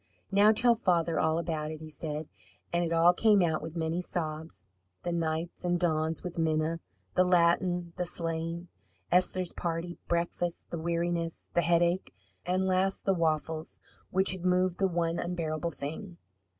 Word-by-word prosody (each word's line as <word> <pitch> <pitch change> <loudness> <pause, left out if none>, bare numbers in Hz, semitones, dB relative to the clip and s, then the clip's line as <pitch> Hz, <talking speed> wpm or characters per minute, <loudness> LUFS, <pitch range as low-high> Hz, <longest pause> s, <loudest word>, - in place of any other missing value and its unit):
"Now 205 +2 +6
tell 235 +2 +4
father 170 -7 +1
all 160 0 +2
about 160 -2 -2
it," 155 0 -6
he 155 0 -9
said. 150 0 -4 0.5
And 170 0 +2
it 165 - -2
all 165 +1 +5
came 205 0 +4
out 160 -2 +1
with 160 +1 -7
many 165 +1 -1
sobs 155 - -5 0.4
the 175 - -1
nights 165 0 -2
and 175 0 +1
dawns 160 -2 0
with 175 -1 -5
Minna, 160 0 +1 0.3
the 185 - +4
Latin, 175 0 +2
the 180 -1 -1
sleighing, 165 0 -3 0.4
Esther's 185 0 +2
party, 170 0 -3
breakfast, 170 0 -2
the 170 - -3
weariness, 170 0 -2
the 175 - +3
headache; 170 +2 +1 0.3
and 185 +1 +1
last 190 +1 +1
the 195 - +4
waffles, 160 -1 -1 0.3
which 190 +1 +3
had 185 -2 -4
moved 180 0 +2
the 195 - +3
one 170 -1 -1
unbearable 170 -2 -2
thing. 165 +5 -7
170 Hz, 160 wpm, -30 LUFS, 160-180 Hz, 0.5 s, Now